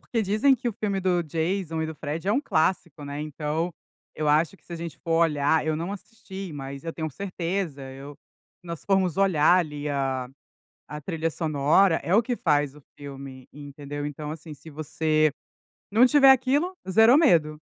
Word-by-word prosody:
Porque 230 - -2
dizem 215 +7 +3
que 245 -1 -3
o - - -3
filme 200 -2 -2
do 180 -2 +1
Jason 165 +1 -2
e - - -1
do 160 - -6
Fred 155 +3 -5
é - - +3
um 260 - +2
clássico, 170 - -1
né, 145 +1 -5
então, 155 +3 -3 0.4
eu 155 -1 -1
acho 155 +5 +2
que - - -30
se - - -11
a - - -4
gente 165 -1 -7
for 165 -1 +1
olhar, 150 -1 +2
eu 155 - +1
não 170 +4 -4
assisti, 195 -3 -9
mas 140 +1 -7
eu 165 - -4
tenho 160 -1 -4
certeza, 180 -3 -4
eu 140 +2 -10 0.5
nós 170 -2 -7
formos 190 -4 +1
olhar, 180 -3 +4
ali, 150 -4 -3
a 135 -3 -2 0.6
a 150 - -7
trilha 165 +1 -2
sonora 160 +3 +2
é 165 +6 -1
o 215 - +6
que 245 +1 -2
faz 145 - +1
o 150 - -15 0.2
filme, 135 -2 -9
entendeu. 145 0 -7
Então 150 +1 -6
assim, 155 0 -8
se 145 +3 -13
você 155 0 +1 0.6
não 230 +5 +6
tiver 275 0 +6
aquilo, 265 +7 +3 0.2
zerou 225 +7 +6
medo, 160 - +3
160 Hz, 185 wpm, -25 LUFS, 150-195 Hz, 0.6 s, o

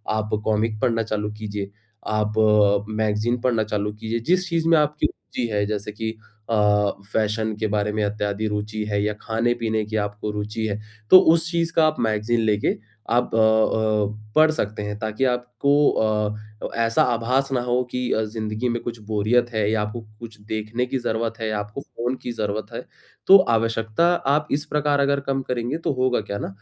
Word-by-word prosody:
आप 110 0 -2 0.2
कॉमिक 110 0 0
पढ़ना 115 -2 +2
चालू 105 -1 -3
कीजिए, 105 -2 -5 0.4
आप 105 0 0 0.6
मैगज़ीन 110 +2 0
पढ़ना 115 -3 +2
चालू 105 0 -2
कीजिए। 110 +2 -3
जिस 180 0 +2
चीज़ 165 -1 0
में 165 - +6
आपकी 150 0 +1
रुचि 120 - -5
है 105 0 +1
जैसे 105 0 -3
कि 110 +1 -4 0.4
अ, 105 -2 +3 0.2
फैशन 110 0 0
के 110 - 0
बारे 105 0 0
में 105 0 0
इत्यादि 105 +1 -1
रुचि 105 +1 -3
है 100 0 +1
या 105 0 0
खाने-पीने 115 -1 0
की 110 - -6
आपको 105 0 -3
रुचि 105 +2 -3
है। 105 0 -3 0.3
तो 185 - +12
उस 165 0 0
चीज़ 165 -1 0
का 160 - +5
आप 155 - 0
मैगज़ीन 110 +1 +1
लेके 105 -2 +1 0.4
आप 120 0 +1
अ-अ, 110 -1 +2
पढ़ 155 0 +6
सकते 105 -9 -3
हैं। 105 0 -4
ताकि 110 +4 -1
आपको 130 +4 +2
अ, 105 -1 0 0.4
ऐसा 115 0 +2
आभास 125 +3 0
ना 125 - +1
हो 125 +1 +1
कि 125 -1 -2
अ, 110 - +1
ज़िंदगी 110 +2 -3
में 120 0 -2
कुछ 120 -1 -5
बोरियत 110 +3 +2
है 105 -2 +1
या 110 -1 +1
आपको 105 +3 -4 0.2
कुछ 115 -2 -10
देखने 110 +3 -3
की 130 - -2
ज़रूरत 115 -1 -1
है, 110 - -1
आपको 105 +4 -4
फ़ोन 125 -1 -4
की 120 - -3
ज़रूरत 110 0 -3
है। 115 - -4 0.5
तो 195 - +10
आवश्यकता 115 +4 +1 0.2
आप 150 +2 +2
इस 145 +1 0
प्रकार 145 -1 +1
अगर 140 0 +2
कम 135 0 0
करेंगे 125 +4 -1
तो - - +1
होगा 130 -2 +1
क्या 100 -1 -5
ना - - -3
110 Hz, 185 wpm, -23 LUFS, 105-125 Hz, 0.6 s, तो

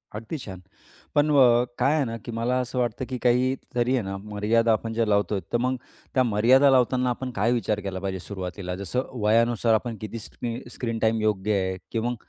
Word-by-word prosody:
अगदी 115 +9 -5
छान, 95 -8 -9 0.5
पण 145 +1 +4
व 145 - +5 0.4
काय 145 +3 +3
आहे 150 - +2
ना, 115 -1 -4
की 120 - -5
मला 115 +2 -1
असं 125 0 -3
वाटतं, 120 +1 -1
की 130 - -3
काहीतरी 125 0 +1
आहे 125 - +1
ना 95 0 -4
मर्यादा 105 +3 +1
आपण 115 +1 -2
ज्या 115 0 +1
लावतोय, 105 -1 +1
तर - - +4
मग 130 +2 0 0.4
त्या 130 - +4
मर्यादा 125 +5 +5
लावताना 125 0 +3
आपण 125 +1 -3
काय 110 +4 +2
विचार 110 -3 0
केला 95 -2 -4
पाहिजे 95 0 -3
सुरुवातीला, 90 -1 -5
जसं 100 +7 -3
वयानुसार 115 +1 +3
आपण 115 +1 0
किती 110 +2 -5
स्किन 115 +2 -6
स्क्रीन 115 -2 -3
टाईम 110 0 +1
योग्य 105 -1 +1
आहे, 95 0 -2
की 115 - -1
मग 120 +2 -1
115 Hz, 200 wpm, -25 LUFS, 105-125 Hz, 0.5 s, व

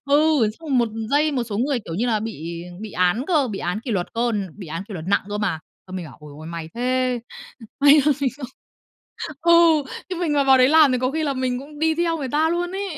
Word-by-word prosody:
Ừ, 280 +1 +3 0.4
xong 285 -6 0
một 235 - +2 0.2
dây, 300 +2 +2
một 255 -3 0
số 210 -3 -4
người, 265 +1 +1
kiểu 170 -6 -7
như 230 +8 0
là, 220 -3 +1
bị 170 -6 -6 0.2
bị 220 -1 -7
án 180 +7 +1
cơ, 300 -8 +2
bị 195 - -4
án 180 +5 -2
kỷ 240 - -6
luật 185 -5 0
cơ, 235 +1 0 0.2
bị 190 - -9
án 165 +3 -5
kỷ 210 - -8
luật 160 -3 -6
nặng 200 - +2
cơ 205 - -3
mà. 200 -6 -1 0.3
Xong, 185 0 -7
mình 180 - -5
bảo: 135 - -13
"Ồi 150 -1 -12
ôi, 155 +1 -10
may 165 -1 -6
thế, 255 +1 0 0.6
may 290 +1 +7
mà 295 - +5
mình 270 - +1
không" 280 -3 -6 1.0
Ừ, 340 - +4 0.6
chứ 370 - -4
mình 335 -3 -1
mà 285 -1 +2
vào 265 -1 +6
đấy 255 0 +6
làm 305 -3 +6
thì 250 - +1
có 255 +1 0
khi 315 +3 -2
là 280 -2 -1
mình 255 -1 -1
cũng 290 +3 -11
đi 320 0 +2
theo 335 0 0
người 275 -3 -4
ta 305 +4 +2
luôn 350 +1 -1
ấy. 385 -4 -4
255 Hz, 260 wpm, -22 LUFS, 205-295 Hz, 1.0 s, may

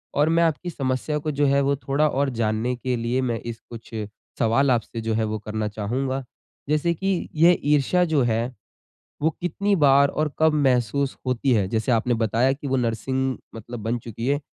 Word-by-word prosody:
और 150 +2 +3
मैं 170 +1 +3
आपकी 165 +2 0
समस्या 135 0 -2
को 155 +1 -2
जो 145 +1 +1
है, 140 0 +3
वो 140 +1 +2
थोड़ा 140 +2 +1
और 140 0 0
जानने 110 +3 0
के 125 +1 -2
लिए 120 +3 0
मैं 120 -3 -1
इस 115 -1 -7
कुछ 115 -1 -10 0.5
सवाल 130 +4 +3
आपसे 115 -1 -1
जो 110 0 -1
है 110 0 +1
वो 110 0 -2
करना 110 0 -3
चाहूँगा। 130 +6 -2 0.5
जैसे 155 +3 +2
कि 190 +1 -2
ये 170 +3 +6 0.2
ईर्ष्या 180 +5 +3
जो 155 -5 +2
है, 120 +2 -1 0.7
वो 160 - +3
कितनी 200 +3 0
बार 140 -2 +5
और 150 0 -1
कब 160 0 +4
महसूस 135 -1 +1
होती 125 +1 +1
है? 100 -3 +2
जैसे 110 +3 0
आपने 120 +2 +2
बताया 115 +4 +2
कि 140 +1 -6
वो 135 - +1
नर्सिंग 130 +2 -1 0.2
मतलब 115 +1 -8
बन 115 +2 -1
चुकी 115 +1 -6
है। 145 +2 +1
130 Hz, 195 wpm, -24 LUFS, 115-145 Hz, 0.7 s, ये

